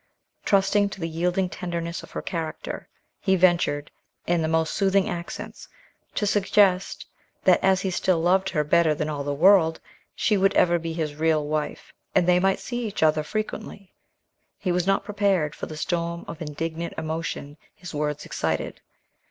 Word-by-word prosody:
Trusting 200 +1 +3
to 195 - -9
the 165 - -2
yielding 180 +3 0
tenderness 170 -2 -4
of - - -13
her - - -6
character, 165 -3 -5 0.3
he 190 -1 +2
ventured, 170 -5 +2 0.3
in 175 -1 +1
the 160 - 0
most 160 0 +1
soothing 195 -1 +2
accents, 170 0 -6 0.5
to 210 - 0
suggest 195 -2 +2 0.4
that - - +4
as 190 -1 +4
he 190 - -1
still 180 -1 +1
loved 185 +3 +2
her 150 -4 0
better 155 +1 +3
than 155 +1 -2
all 145 -2 -3
the 145 - -2
world, 165 0 +5 0.4
she 210 - +2
would 195 +1 +2
ever 175 -1 +4
be 165 0 -4
his 155 -3 -2
real 155 -1 +2
wife, 150 0 -3 0.2
and 175 - +4
they 180 0 +5
might 190 +1 +2
see 240 -1 -4
each 205 -5 -2
other 155 0 +4
frequently. 205 +1 -5 0.6
He 185 - -1
was 175 +1 0
not 195 - +2
prepared 200 -7 +1
for - - -6
the 155 - -8
storm 170 +1 -2
of 165 0 -8
indignant 165 +2 -4
emotion 160 -2 -4 0.2
his 180 - -9
words 150 0 -2
excited. - - -2
170 Hz, 170 wpm, -25 LUFS, 160-190 Hz, 0.6 s, world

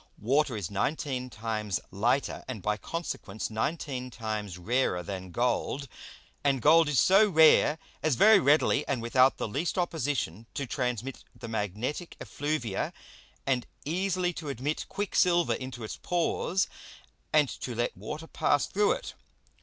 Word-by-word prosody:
Water 130 +2 +1
is 100 -4 -4
nineteen 130 +3 -2
times 110 -4 -2
lighter, 120 +8 0
and 115 -7 -6
by 105 0 +1
consequence 140 -3 -5
nineteen 130 +2 -2
times 110 -6 -4
rarer 90 -2 0
than 95 +1 -6
Gold; 125 +6 -1 0.6
and 140 -2 +2
Gold 160 +4 +5
is 145 - +3
so 200 +3 +6
rare 160 -2 +6 0.2
as 155 -3 +2
very 215 - +7
readily 150 -2 +3
and 130 - 0
without 130 +3 +4
the - - -2
least 150 - -2
opposition 140 - -1
to 140 - -2
transmit 125 -1 -3
the 115 0 -8
magnetick 110 - -3
Effluvia, 145 -9 -2 0.5
and 130 -3 0 0.2
easily 180 +2 0
to 160 -3 -6
admit 140 +4 -3
Quicksilver 180 -4 +2
into 130 -3 -6
its 110 - -6
Pores, 180 +2 0 0.6
and 150 -2 +4
to 125 -1 -6
let 120 +1 -1
Water 150 - -6
pass 145 -2 +1
through 205 +1 +2
it. - - -6
130 Hz, 140 wpm, -29 LUFS, 110-155 Hz, 0.6 s, very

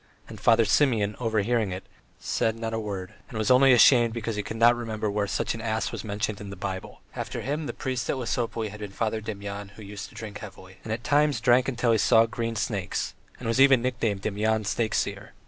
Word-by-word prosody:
and - - -10
Father 115 -1 +5
Simeon 110 -8 +2
overhearing 110 -2 +1
it, 95 +1 -5 0.3
said 110 0 -1
not 115 0 -4
a 115 - -1
word, 100 -4 -5 0.2
and 115 - -7
was 110 +3 +1
only 130 +1 +7
ashamed 120 -1 +6
because 115 -1 -3
he 105 - -1
could 105 +2 -6
not 120 +1 +6
remember 110 -3 -3
where 100 0 0
such - - -1
an 115 - -6
ass 110 0 -1
was - - -5
mentioned 105 0 -3
in 100 - -7
the 100 - -7
Bible. 95 0 -6
After - - -4
him 145 +3 -3
the - - -2
priest 130 -2 -3
at - - +1
Lesopolye 115 -2 -2
had 105 - -10
been 105 -1 -6
Father 110 +2 -2
Demyan, 100 -1 -6
who 110 - -11
used 100 0 -8
to - - -19
drink 110 -2 -7
heavily, 95 -2 -11
and 110 - -6
at 115 +2 -3
times 145 0 +2
drank 125 0 +3
till 120 -1 +2
he 110 - +3
saw 115 +2 +5
green 115 0 -3
snakes, 105 -4 -2 0.3
and 125 - -5
was 115 +4 +2
even 135 -3 +6
nicknamed 115 -6 -1
Demyan 110 +1 0
Snakeseer. 110 -1 -1
110 Hz, 220 wpm, -26 LUFS, 105-120 Hz, 0.3 s, only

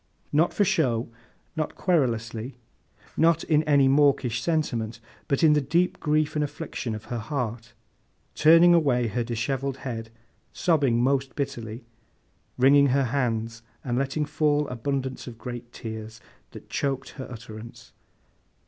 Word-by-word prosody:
Not 160 +4 +3
for 205 - +2
show, 120 -9 +1 0.5
not 155 -2 -3
querulously, 120 -7 -1 0.6
not 165 0 +3
in 155 -2 +3
any 140 -3 +4
mawkish 135 -4 +3
sentiment, 120 -8 -1 0.3
but 140 - 0
in 155 -2 +7
the 150 - +3
deep 170 +6 +1
grief 155 0 +1
and 150 - 0
affliction 145 -5 -4
of 110 - -9
her 120 - -2
heart; 115 -3 -4 0.6
turning 165 +3 +6
away 130 -8 +2
her 120 +3 -1
dishevelled 130 +3 -2
head: 115 -3 -4 0.4
sobbing 140 -8 +2
most 135 -1 0
bitterly, 120 -5 -5 0.7
wringing 140 +2 +6
her 135 +1 +2
hands, 115 -3 -1 0.2
and 120 -2 -2
letting 140 +3 -1
fall 150 -1 +1
abundance 130 +2 -3
of 120 -2 -8
great 120 -1 -7
tears, 110 -1 -7 0.3
that - - -12
choked 135 -2 -2
her 130 - -8
utterance. 115 -1 -10
135 Hz, 135 wpm, -26 LUFS, 115-150 Hz, 0.7 s, in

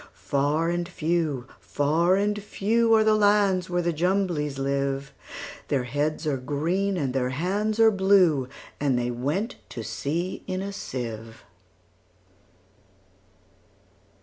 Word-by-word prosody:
Far 145 +4 0
and 175 0 -2
few, 160 -6 -1
far 160 +6 +2
and 205 +1 0
few, 225 +3 +1
Are 220 - +5
the 215 0 +4
lands 205 -3 +3
where 175 0 0
the 170 0 0
Jumblies 170 -4 0
live:Their 140 0 -3
heads 150 +5 -2
are 145 -3 0
green, 170 +9 -1
and 135 -6 -1
their 130 -1 0
hands 200 - -1
are 225 -1 +7
blue; 190 -9 +3 0.3
And 140 -3 +1
they 120 0 -1
went 145 - -2
to 115 - -6
sea 145 - -3
in 185 +1 -2
a 200 0 -5
sieve. 115 - -6
165 Hz, 120 wpm, -26 LUFS, 140-195 Hz, 0.3 s, are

